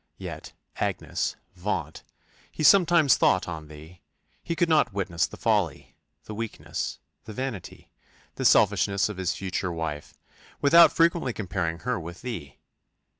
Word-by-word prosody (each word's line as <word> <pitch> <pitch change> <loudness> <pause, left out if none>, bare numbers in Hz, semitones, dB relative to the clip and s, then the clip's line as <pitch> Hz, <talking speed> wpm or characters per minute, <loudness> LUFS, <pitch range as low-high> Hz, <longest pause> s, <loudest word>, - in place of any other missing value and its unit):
Yet, - - -8 0.2
Agnes, - - -2 0.2
vaunt! - - -4 0.5
he - - -5
sometimes 170 -4 +6
thought 95 - +2
on 80 -3 -6
thee 80 +4 -13 0.4
he 170 - -3
could 175 0 +2
not 155 -6 +3
witness 95 -4 -1
the - - -12
folly, - - -1 0.3
the 110 - -8
weakness, 115 +1 -5 0.3
the 110 - -8
vanity, 130 -6 -6 0.4
the - - -5
selfishness 100 -1 +3
of 105 - -7
his 95 -2 -1
future 95 -1 -3
wife, 80 -3 -5 0.4
without 165 +4 +7
frequently 165 -6 +2
comparing 85 -5 -3
her 125 -3 -1
with 85 +4 -9
thee. 85 - -6
100 Hz, 135 wpm, -26 LUFS, 85-140 Hz, 0.5 s, without